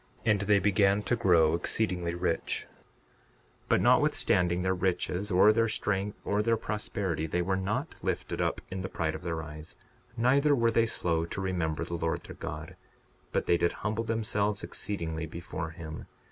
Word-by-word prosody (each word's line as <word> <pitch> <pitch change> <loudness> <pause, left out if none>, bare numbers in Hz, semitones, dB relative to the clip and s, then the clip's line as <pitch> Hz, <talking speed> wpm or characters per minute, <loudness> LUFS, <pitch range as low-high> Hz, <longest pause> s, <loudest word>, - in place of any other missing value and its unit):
And 105 -3 +3
they 100 0 +4
began 100 +1 +3
to 120 - +1
grow 85 -8 +4
exceedingly 90 -1 0
rich. 85 -1 -1 1.0
62:49 - - -31
But - - +4
notwithstanding 90 0 +3
their 95 0 +2
riches, 90 +1 -1
or 95 +4 +6
their 115 +1 +2
strength, 105 -2 -1
or 105 +1 +1
their 115 +1 +2
prosperity, 100 -7 -2
they 90 +2 0
were 95 +2 0
not 95 +2 -2
lifted - - -2
up - - 0
in 95 0 -3
the 95 - -4
pride 80 -4 -1
of - - -6
their 85 -2 -3
eyes; 75 0 -9 0.4
neither 140 +5 +4
were 115 -2 +2
they 115 0 +3
slow 85 -6 0
to 85 - -5
remember 85 -4 -1
the 85 - -7
Lord 80 -1 -1
their - - -10
God; 75 +1 -7 0.6
but - - 0
they 85 - +3
did 85 0 +1
humble 110 +1 0
themselves 105 -2 0
exceedingly 80 -6 -3
before 80 0 -5
him. 80 -1 -8
95 Hz, 175 wpm, -29 LUFS, 85-105 Hz, 1.0 s, or